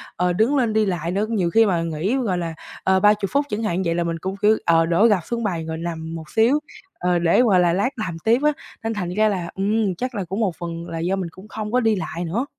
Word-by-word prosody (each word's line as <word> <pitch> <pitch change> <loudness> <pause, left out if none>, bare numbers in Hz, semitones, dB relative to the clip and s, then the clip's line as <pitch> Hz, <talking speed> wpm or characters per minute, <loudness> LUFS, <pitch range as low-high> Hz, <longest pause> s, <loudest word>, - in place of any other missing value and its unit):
ờ, 180 0 +1
đứng 220 +10 +2
lên 240 -5 +1
đi 220 0 +3
lại 175 -3 -2
nữa. 200 +3 0
Nhiều 195 -7 +1
khi 225 +5 +5
mà 180 -5 +1
nghỉ, 165 +8 -1
gọi 215 -9 0
là, 170 -2 -3 0.3
ờ, 190 0 +3
30 210 0 +3
phút 285 +1 +2
chẳng 215 +2 -2
hạn, 185 -3 0
vậy 165 0 0
là 175 - 0
mình 165 -1 -2
cũng 190 +3 -4
kiểu, 215 +1 +4
ờ, 165 -1 +4
đổ 170 +6 +3
gập 205 -4 +3
xuống 235 -1 -3
bàn 170 -6 -2
rồi 160 0 -4
nằm 165 -1 -5
một 160 -2 -8
xíu, 235 - +3 0.4
ờ, 180 0 +1
để, 170 +6 +4
gọi 205 -7 +4
là, 175 -1 +3
lát 200 +7 +1
làm 185 -9 -4
tiếp 230 +3 +3
á. 300 - +4 0.3
Nên 225 0 -1
thành 185 -5 -3
ra 215 +3 +3
là, 180 -4 -3
ừm, 200 0 0
chắc 250 +6 -4
là 200 - -2
cũng 190 +4 -4
một 195 -7 0
phần 170 0 -5
là 165 - -4
do 175 +4 0
mình 185 -3 -3
cũng 185 +5 -14
không 215 -1 -5
có 250 - +3
đi 225 -3 +2
lại 180 -2 -4
nữa. 210 +11 -1
190 Hz, 275 wpm, -22 LUFS, 170-220 Hz, 0.4 s, khi